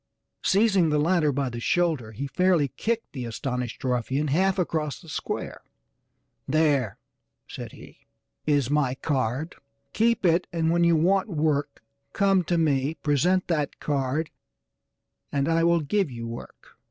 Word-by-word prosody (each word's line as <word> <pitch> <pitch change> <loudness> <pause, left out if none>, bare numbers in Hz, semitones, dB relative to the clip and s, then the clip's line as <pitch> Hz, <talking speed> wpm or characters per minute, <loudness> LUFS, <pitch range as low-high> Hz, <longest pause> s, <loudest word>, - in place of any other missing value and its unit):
Seizing 195 -4 +3
the 150 - +2
latter 155 0 +2
by 140 0 -1
the 120 -1 -6
shoulder 155 -5 0
he 115 +6 -5
fairly 175 -1 +2
kicked 230 - -3
the 130 -4 -5
astonished 125 +1 -4
ruffian 130 +3 0
half 190 +6 +2
across 160 -5 -1
the 170 - -16
square. 155 - -4 0.9
"There," 140 - +2 0.5
said - - -8
he, - - -15 0.4
"is 145 -3 +2
my 145 -4 +1
card, 135 +2 -2 0.4
keep 230 -2 +2
it 175 +1 +3
and 165 -1 +1
when 170 0 +3
you 170 -1 +4
want 190 +6 +2
work 150 - -1 0.3
come 195 -2 +3
to 175 - +1
me, 150 -2 +1
present 155 +5 +1
that 150 -4 -1
card, 145 +2 -1 1.0
and 140 0 0
I 165 0 +2
will 170 0 +3
give 190 +4 0
you 115 -2 -7
work." 115 +1 -10
155 Hz, 145 wpm, -26 LUFS, 135-175 Hz, 1.0 s, you